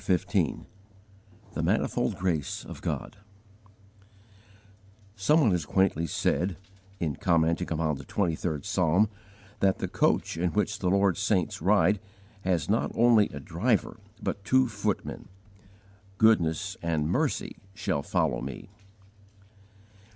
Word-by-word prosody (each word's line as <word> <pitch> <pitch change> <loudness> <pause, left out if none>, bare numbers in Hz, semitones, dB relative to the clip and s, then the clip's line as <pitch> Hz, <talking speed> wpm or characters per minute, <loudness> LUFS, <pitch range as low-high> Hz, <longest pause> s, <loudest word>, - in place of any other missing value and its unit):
CHAPTER 95 -1 +3 0.3
XV - - -7 0.9
THE - - -2
MANIFOLD - - 0
GRACE 85 -6 -2
OF - - -9
GOD - - -4 2.0
SOME 150 +11 +3
one 115 -8 +4
has 90 -3 0
quaintly 90 -3 +1
said, 90 +4 0 0.4
in 80 -5 -2
commenting 85 0 +1
upon 80 -1 0
the 70 - -9
Twenty 90 +3 0
third 80 -2 -3
Psalm, 95 0 +2 0.5
that 95 -1 +3
"the - - -3
coach - - +1
in 85 0 0
which 105 0 0
the 90 - 0
Lord's 100 -1 +2
saints 95 -6 0
ride 100 +1 +3 0.4
has 85 -5 0
not 110 +3 +1
only 115 -3 +5
a - - -7
driver, 110 +6 -1 0.2
but 100 - -3
two 130 +4 +3
footmen" 105 -2 -3 0.9
_"goodness 95 -4 +3
and 80 -3 0
mercy - - -1 0.2
shall 95 -8 -1
follow - - 0
me." 65 +5 -7
95 Hz, 125 wpm, -28 LUFS, 80-105 Hz, 2.0 s, only